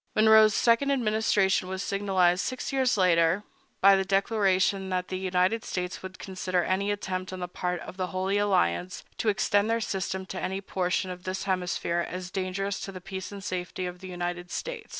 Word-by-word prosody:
Monroe's 220 -1 +6
second 235 +4 +3
administration 215 -7 +2
was 190 +1 -3
signalized, 190 -2 +2
six 255 +1 -4
years 260 -4 +2
later, 175 +1 +3 0.4
by 195 0 +8
the 195 - +1
declaration 195 -1 +1
that 180 -1 -2
the 185 - -3
United 185 +4 +1
States 180 -1 -4
would 185 0 -8
consider 185 -1 -2
any 195 +2 0
attempt 190 -2 -3
on 185 - -6
the 180 - -3
part 180 0 -3
of 185 - -9
the 185 -1 -1
Holy 190 +2 0
Alliance 185 - +1 0.2
to 220 - +2
extend 205 +1 +2
their 230 0 +2
system 190 -3 -3
to 185 0 -6
any 190 +1 -2
portion 185 -1 -1
of 180 0 -8
this 185 +1 -3
hemisphere 180 -2 -1
as 180 0 -6
dangerous 190 +1 -2
to 195 - -6
the 185 - -8
peace 190 +1 -7
and 200 -1 -8
safety 185 0 -3
of 180 0 -6
the 190 - -9
United 175 0 -4
States. - - -5
190 Hz, 190 wpm, -27 LUFS, 180-200 Hz, 0.4 s, by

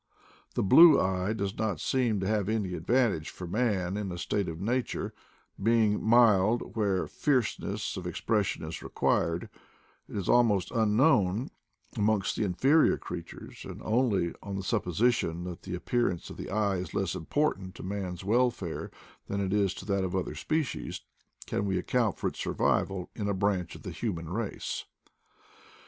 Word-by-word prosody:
The - - +1
blue 155 - +8
eye 95 +2 0
does 100 -2 -3
not 105 -7 -1
seem 120 -3 +1
to 95 - -1
have 105 -2 0
any 105 -5 -1
advantage 95 -2 +1
for 90 - -8
man 100 -2 0
in 100 -3 -3
a 90 - -5
state 100 +2 -1
of 80 0 -6
nature, 120 +6 -2 0.5
being 110 -1 +3
mild 110 -1 +4
where 100 -4 +1
fierceness 110 -6 -1
of 90 -1 -5
expression 105 +3 -1
is - - -6
required; 85 +1 0 0.6
it - - -8
is 95 - -3
almost 110 -6 +3
unknown 110 - +3 0.4
amongst 105 -2 +1
the - - 0
inferior 135 - +3
crea - - -5
tures; - - -11
and - - -8
only 105 -7 +1
on 100 -1 -5
the 95 - -3
supposition 90 -2 +1
that 90 0 -6
the 90 -1 -5
ap 90 - -9
pearance 120 -8 0
of - - -10
the - - -6
eye 100 -1 +1
is 90 - -6
less 95 -4 0
important 95 - -1
to - - -9
man's 95 -2 -4
welfare 115 -5 0 0.4
than 100 - -2
it 95 -1 -1
is 100 -3 +2
to - - -8
that 100 -1 0
of 95 0 -2
other 95 - -2
species, 155 -4 -2 0.4
can - - -2
we 95 -1 0
account 110 +3 0
for - - -1
its - - -12
survival 95 -2 0
in 105 -2 -2
a 100 - 0
branch 95 -3 0
of - - -12
the - - -5
hu 115 -2 -2
man 85 -1 -7
race. 105 +4 -3
100 Hz, 170 wpm, -29 LUFS, 95-115 Hz, 0.6 s, blue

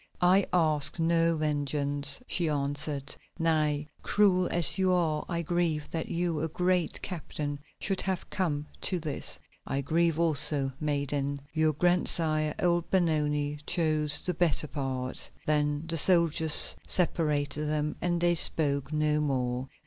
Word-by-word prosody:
"I 185 +2 +3
ask 155 -3 +3
no 165 0 +2
vengeance," 145 - 0
she 170 -8 -1
answered. 145 0 -2 0.2
"Nay, 155 -3 0
cruel 185 -3 +2
as 175 +2 +1
you 185 -1 +2
are 165 -4 0
I 170 -1 -2
grieve 165 -3 -2
that 165 -1 -4
you, 170 -2 -1
a 160 - -1
great 180 +1 -1
captain, 150 -5 -5 0.2
should 195 -1 -1
have 190 -2 -3
come 150 -7 -2 0.2
to 185 - +1
this." 155 -3 -4 0.3
"I 135 +1 -2
grieve 165 +3 0
also, 150 -4 +3
maiden. 145 -1 -2
Your 155 -1 +1
grandsire, 155 -2 0
old 175 -1 0
Benoni, 150 -5 0
chose 155 -3 +3
the 180 - -2
better 165 -2 0
part." 130 -3 -4 0.2
Then 150 0 0
the 165 0 -2
soldiers 165 -2 +5
separated 150 -4 -1
them 150 0 -2
and 175 -1 -1
they 175 0 +3
spoke 145 -4 +1
no 150 0 +1
more. 130 -3 -2
155 Hz, 135 wpm, -28 LUFS, 145-170 Hz, 0.3 s, soldiers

